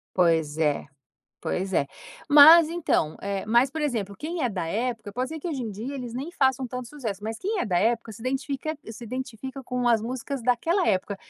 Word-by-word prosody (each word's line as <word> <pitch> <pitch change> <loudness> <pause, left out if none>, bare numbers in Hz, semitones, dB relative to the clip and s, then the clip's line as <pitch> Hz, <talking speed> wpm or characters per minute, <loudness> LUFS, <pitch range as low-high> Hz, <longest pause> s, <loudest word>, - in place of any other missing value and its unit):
Pois 160 -4 +2
é, 150 -3 +1 0.6
pois 190 +1 -2
é. 140 -6 +2 0.4
Mas, 310 +3 +9
então, 325 - 0
eh, 200 0 -3
mas, 240 +4 +4
por 315 - -4
exemplo, 215 -9 -2
quem 325 +1 -4
é 250 - +2
da 180 -6 -3
época 220 +2 -3
pode 255 +4 -2
ser 320 0 -6
que 330 - -7
hoje 280 -7 -3
em 220 - -4
dia 225 +8 -6
eles 245 -4 -6
nem 285 +7 -5
façam 265 -3 +1
tanto 250 -1 -6
sucesso, 225 -9 -5
mas 220 +1 -4
quem 405 0 -2
é - - 0
da 180 -5 +1
época 230 +2 +1
se 215 - -11
identifica 270 +4 -3
se 235 +1 -9
identifica 260 +2 -6
com 250 -1 -2
as 225 -2 +3
músicas 255 +2 -4
daquela 255 - +1
época. 200 0 0
245 Hz, 205 wpm, -26 LUFS, 205-275 Hz, 0.6 s, Mas